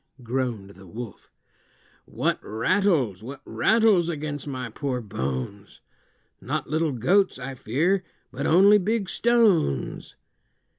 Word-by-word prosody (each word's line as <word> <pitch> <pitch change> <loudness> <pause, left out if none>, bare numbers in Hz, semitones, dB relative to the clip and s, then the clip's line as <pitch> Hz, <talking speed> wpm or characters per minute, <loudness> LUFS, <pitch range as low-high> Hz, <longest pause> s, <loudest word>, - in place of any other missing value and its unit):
groaned 120 -5 -3
the 95 -1 -15
wolf; 110 +2 -9 0.8
"What - - -1
rattles, 120 - +1
what 135 +5 -8
rattles 220 -7 +3
against 150 -2 -4
my 130 -4 -5
poor 130 +1 -3
bones? 95 - -5 0.6
Not - - -3
little 155 0 0
goats, 185 - +2
I 130 +1 -6
fear, 160 - 0 0.3
but - - -3
only 200 +5 +6
big 205 0 -1
stones." 205 - +1
135 Hz, 110 wpm, -25 LUFS, 110-185 Hz, 0.8 s, only